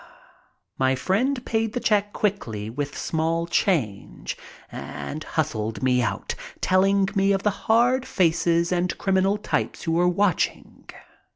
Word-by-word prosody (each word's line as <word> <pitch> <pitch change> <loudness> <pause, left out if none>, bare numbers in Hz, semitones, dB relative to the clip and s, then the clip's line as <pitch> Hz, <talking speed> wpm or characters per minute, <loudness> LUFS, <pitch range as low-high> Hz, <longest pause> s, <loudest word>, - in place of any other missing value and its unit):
My 130 0 +3
friend 245 - 0
paid 225 -1 0
the 245 - -1
check 205 -3 +1
quickly 115 - -2
with 140 +3 -4
small 165 +1 -1
change 150 - -1 0.4
and 75 - -6
hustled 115 -8 -2
me 125 -1 +3
out, 100 -4 -2 0.3
telling 195 +1 +3
me 195 -1 +3
of 195 - -1
the 210 - +3 0.2
hard 245 +3 +4
faces 170 -1 +2
and 180 0 0
criminal 195 +1 +2
types 210 - -2
who 165 - -1
were 175 +2 +3
watching. 185 0 -1
180 Hz, 130 wpm, -24 LUFS, 145-200 Hz, 0.4 s, hard